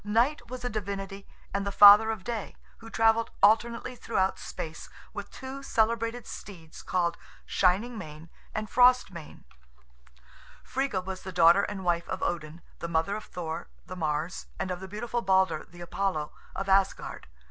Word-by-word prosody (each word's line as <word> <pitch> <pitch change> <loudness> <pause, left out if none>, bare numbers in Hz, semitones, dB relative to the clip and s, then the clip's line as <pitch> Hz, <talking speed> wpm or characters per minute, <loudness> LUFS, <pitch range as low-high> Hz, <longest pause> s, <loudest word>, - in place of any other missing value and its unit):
Night 230 +9 +1
was 250 0 -6
a - - 0
divinity 195 -1 -5 0.3
and 200 0 0
the 200 - -2
father 205 +2 +9
of 220 -4 -3
Day, 230 -2 -4 0.2
who 225 - -11
travelled 225 0 +3
alternately 230 +4 +3
throughout 190 -5 0
space, 160 0 -7 0.2
with - - -6
two 265 +1 -8
celebrated 230 -1 0
steeds 165 -6 -10
called 175 -2 0 0.3
Shining 210 +6 +1
mane 155 -2 -10 0.2
and 215 0 -3
Frost 250 -1 +5
mane. 165 -4 -11 1.2
Friga 255 -9 -2
was 190 -1 -5
the 190 - -7
daughter 170 +2 +6
and 200 -1 -4
wife 170 -1 0
of - - -3
Odin; 165 -1 -3 0.2
the 170 - -4
mother 165 +4 0
of 215 - -6
Thor, 165 -2 -5 0.2
the 185 - -8
Mars, 155 +1 -2
and 185 - -3
of 180 - -3
the 190 - -8
beautiful 235 +4 -3
Balder, 190 -5 +2
the 175 +1 -13
Apollo, 175 -3 -2 0.2
of 195 +1 -3
Asgard. 195 0 +1
195 Hz, 160 wpm, -28 LUFS, 175-225 Hz, 1.2 s, father